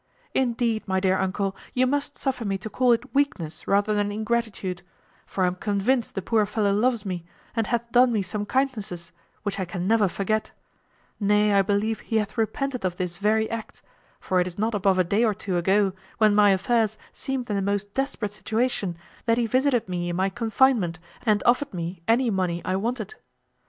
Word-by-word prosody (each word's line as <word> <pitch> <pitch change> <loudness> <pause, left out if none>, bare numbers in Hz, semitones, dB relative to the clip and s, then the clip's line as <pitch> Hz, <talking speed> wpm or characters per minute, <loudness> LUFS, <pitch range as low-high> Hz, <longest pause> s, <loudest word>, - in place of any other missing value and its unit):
Indeed, 235 -4 0
my 190 0 +1
dear 190 0 +2
uncle, 190 +1 -1 0.2
you 255 0 +4
must 285 +2 -1
suffer 260 -3 -2
me 195 -2 -1
to 210 +3 -7
call 255 -1 +3
it 230 - 0
weakness 275 - -1
rather 205 +2 +2
than 205 0 0
ingratitude; 215 -4 -2 0.5
for 190 - -1
I - - +5
am 180 - 0
convinced 210 +6 0
the 195 - -3
poor 215 -1 +2
fellow 205 -1 +1
loves 230 +1 +1
me, 180 -3 -3 0.3
and 225 -2 0
hath 235 -1 -1
done 245 +1 +5
me 215 -4 +1
some 205 +3 -4
kindnesses, 210 -11 -2 0.3
which 200 -2 -2
I 190 - -1
can 180 +1 -4
never 220 -1 +4
forget; 215 +4 -1 0.7
nay, 210 0 +3
I 200 - +5
believe 205 +3 0
he 225 - -5
hath 210 -1 0
repented 250 +2 -1
of 180 -2 -1
this 180 -1 -3
very 215 +2 +2
act; 230 -1 -6 0.4
for 185 - 0
it 180 - +1
is 180 - -8
not 220 +3 0
above 195 -2 +2
a 185 - +4
day 200 +6 +1
or 215 -3 +2
two 195 -2 -3
ago, 190 +3 +2 0.2
when 215 -2 +5
my 205 0 +6
affairs 215 +2 +2 0.2
seemed 265 -2 -3
in - - 0
the 200 - 0
most 200 +1 -2
desperate 265 -6 -2
situation, 210 -3 -1 0.3
that 230 0 +3
he 240 - +2
visited 255 0 +2
me 175 -1 -2
in 175 - -2
my 190 +2 +1
confinement, 225 -4 +2 0.3
and 210 -1 +3
offered 250 -1 +2
me 170 0 -4
any 235 +1 +3
money 180 -3 0
I 185 - 0
wanted. 235 - -2
210 Hz, 200 wpm, -25 LUFS, 190-235 Hz, 0.7 s, my